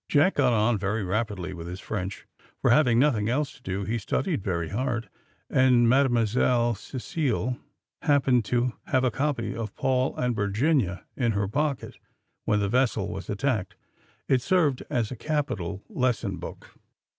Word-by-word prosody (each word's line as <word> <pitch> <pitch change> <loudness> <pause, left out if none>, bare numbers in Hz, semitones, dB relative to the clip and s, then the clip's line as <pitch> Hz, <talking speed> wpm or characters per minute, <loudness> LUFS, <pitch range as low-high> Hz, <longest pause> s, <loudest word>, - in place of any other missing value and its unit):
Jack 155 +6 +4
got 130 -4 +3
on 110 -1 +2
very 100 +2 -1
rapidly 95 -2 -2
with 85 -1 -7
his 90 +2 -6
French, 100 0 -5 0.3
for, - - +3
having 125 -3 +5
nothing 120 -6 +3
else 140 +3 0
to - - -19
do, 95 -3 -3
he 115 +4 -1
studied 145 - -1
very 85 -4 -2
hard, 120 -1 -2 0.4
and 125 -2 +4
Mademoiselle 120 -1 +3
Cecile 125 +1 -2 0.4
happened 135 -5 +3
to 120 +1 +1
have 130 -1 +2
a 130 - +2
copy 145 +4 -1
of 110 -3 -5
Paul 130 0 +1
and 125 -1 0
Virginia 100 - +1
in 120 -4 +1
her 100 0 0
pocket 145 +5 -2 0.5
when 105 0 +2
the 100 - +1
vessel 115 -3 +1
was 95 +1 -6
attacked. 105 -2 -1 0.5
It 130 -2 +3
served 155 -5 +2
as 115 -3 -1
a - - -4
capital 105 - -2
lesson 130 - -1
book. - - -9
120 Hz, 155 wpm, -26 LUFS, 105-130 Hz, 0.5 s, having